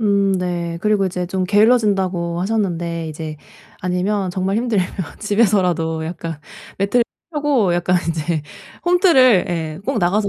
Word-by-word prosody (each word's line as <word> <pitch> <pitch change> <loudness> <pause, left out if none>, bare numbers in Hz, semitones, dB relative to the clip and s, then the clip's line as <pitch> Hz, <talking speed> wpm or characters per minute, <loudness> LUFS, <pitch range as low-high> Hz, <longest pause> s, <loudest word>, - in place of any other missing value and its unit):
음 200 -2 +2
네. 175 -2 -2
그리고 210 -2 +2
이제 180 -1 -3
좀 185 +1 -2
게을러진다고 195 -5 +2
하셨는데 175 -5 -1
이제 155 0 -6 0.4
아니면 185 +2 -1
정말 190 +2 -1
힘들면 225 -6 +1 0.3
집에서라도 185 -7 +1
약간 165 -1 -5 0.4
매트를 200 +5 +2 0.3
펴고 280 -11 +2
약간 175 +1 +1
이제 160 -1 -2 0.4
홈트를 330 - +5
예 160 -1 -3
꼭 275 - 0
나가서 200 +3 +1
185 Hz, 305 characters per minute, -19 LUFS, 170-210 Hz, 0.4 s, 홈트를